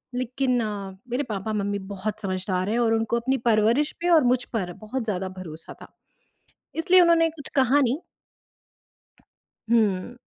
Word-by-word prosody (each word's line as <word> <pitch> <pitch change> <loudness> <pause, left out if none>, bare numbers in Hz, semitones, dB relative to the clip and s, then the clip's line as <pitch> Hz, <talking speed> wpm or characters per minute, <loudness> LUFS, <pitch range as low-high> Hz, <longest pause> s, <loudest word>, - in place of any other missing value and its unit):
लेकिन 250 0 0 0.5
मेरे 265 +4 0
पापा-मम्मी 205 0 -2
बहुत 210 +2 -4
समझदार 185 0 -2
हैं 230 - +1
और 230 -1 +3
उनको 225 +1 0
अपनी 260 +3 0
परवरिश 230 +7 +3
पे 350 - +1
और 325 -4 +6
मुझ 245 0 +2
पर 185 -6 -2
बहुत 220 +6 -5
ज़्यादा 190 -3 -2
भरोसा 160 -3 -9
था। - - -10 0.9
इसलिए 365 +3 +5
उन्होंने 335 -1 +4
कुछ 310 -3 -10
कहा 270 +1 +4
नहीं। 255 +2 +1 1.7
हुँ। 220 0 +1
230 Hz, 140 wpm, -25 LUFS, 200-265 Hz, 1.7 s, और